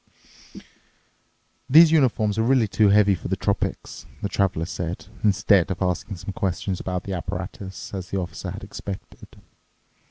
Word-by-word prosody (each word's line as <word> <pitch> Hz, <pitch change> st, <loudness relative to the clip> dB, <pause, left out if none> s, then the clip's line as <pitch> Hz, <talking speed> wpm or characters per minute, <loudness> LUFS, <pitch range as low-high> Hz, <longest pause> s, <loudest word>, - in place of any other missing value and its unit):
"These 160 Hz, +4 st, +8 dB
uniforms 110 Hz, -8 st, +2 dB
are -, -, +4 dB
really 120 Hz, -1 st, +3 dB
too 105 Hz, +1 st, +3 dB
heavy 100 Hz, 0 st, +5 dB
for 85 Hz, -, -5 dB
the -, -, 0 dB
tropics," -, -, -3 dB, 0.2 s
the 100 Hz, -, -1 dB
Traveler 90 Hz, -5 st, 0 dB
said, 90 Hz, -2 st, -5 dB, 0.2 s
instead 100 Hz, -3 st, +3 dB
of 95 Hz, -, -3 dB
asking 95 Hz, +2 st, -2 dB
some 95 Hz, +2 st, -7 dB
questions 95 Hz, 0 st, -2 dB
about 90 Hz, -1 st, -3 dB
the 100 Hz, -, -5 dB
apparatus, 95 Hz, +2 st, -6 dB
as 95 Hz, -2 st, -5 dB
the 100 Hz, -, -2 dB
Officer 90 Hz, -2 st, -5 dB
had -, -, -7 dB
expected. 100 Hz, -1 st, -8 dB
100 Hz, 150 wpm, -24 LUFS, 90-105 Hz, 0.2 s, These